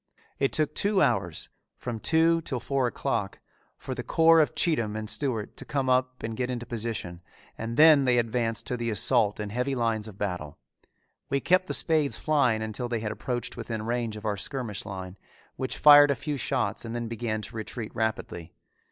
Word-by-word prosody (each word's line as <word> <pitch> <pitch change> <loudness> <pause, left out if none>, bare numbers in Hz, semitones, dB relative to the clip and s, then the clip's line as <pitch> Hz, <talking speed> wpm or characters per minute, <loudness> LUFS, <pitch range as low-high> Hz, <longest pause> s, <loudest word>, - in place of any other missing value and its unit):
It 135 - +1
took 155 -2 +1
two 200 -1 +1
hours, 115 - 0 0.3
from 120 -3 -5
two 165 +5 +3
till 130 -5 -3
four 135 +1 0
o'clock, 100 -4 -2 0.4
for - - -6
the - - -4
corps 165 0 +5
of 150 - 0
Cheatham 115 -11 0
and 110 0 -4
Stewart 115 -3 -1
to - - -3
come 135 -3 -1
up 130 0 0
and 110 0 -4
get 125 +2 -2
into 120 -1 -4
position 110 -7 -4 0.3
and 115 +1 -5
then 155 -3 +7
they 125 -1 +3
advanced 115 -1 0
to 125 - -3
the 120 -1 -2
assault 110 0 +2
in 105 -1 -4
heavy 125 +4 -1
lines 115 -3 -1
of 105 -3 -11
battle. 90 -8 -4 0.7
We 140 - +1
kept 185 +5 +2
the - - +2
spades 155 -4 +1
flying 130 -8 +1
until 110 +3 -4
they 115 -2 -2
had 105 -1 -3
approached 120 -2 -4
within 115 -2 -5
range 115 -2 -2
of 105 - -10
our 105 -2 -1
skirmish 115 0 -4
line, 95 -1 -7 0.4
which 130 - -3
fired 145 -1 +8
a 140 - +2
few 145 +2 -4
shots 130 0 -2
and 115 0 -6
then 120 -1 -3
began 110 -2 -3
to - - -8
retreat 110 0 -6
rapidly. 105 -6 -3
120 Hz, 195 wpm, -27 LUFS, 110-135 Hz, 0.7 s, fired